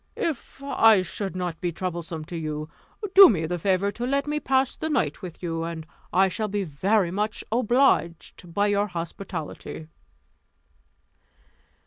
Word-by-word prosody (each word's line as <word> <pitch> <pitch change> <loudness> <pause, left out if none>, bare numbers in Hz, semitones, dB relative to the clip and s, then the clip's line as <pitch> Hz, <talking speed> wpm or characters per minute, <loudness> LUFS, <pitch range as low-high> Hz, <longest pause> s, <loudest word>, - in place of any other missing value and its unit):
If 315 - -4
I 225 -8 +5
should 190 +2 -5
not 180 -3 -4
be 175 - -1
troublesome 170 -2 -5
to 175 - -8
you, 155 -1 -4 0.4
do 390 -1 +11
me 165 -7 0
the 175 +2 -3
favour 195 +2 +1
to 240 +3 -4
let 280 +1 +1
me 300 0 -1
pass 265 -2 +1
the 315 - -4
night 215 - 0
with 180 -2 -9
you, 165 -1 -2
and 165 -1 -5 0.3
I 190 +2 +4
shall 215 +3 -2
be 205 0 -2
very 185 +4 +1
much 210 +3 -2
obliged 220 - +1
by 200 +4 +1
your 205 0 +1
hospitality." 165 -3 -6
185 Hz, 150 wpm, -25 LUFS, 170-220 Hz, 0.4 s, do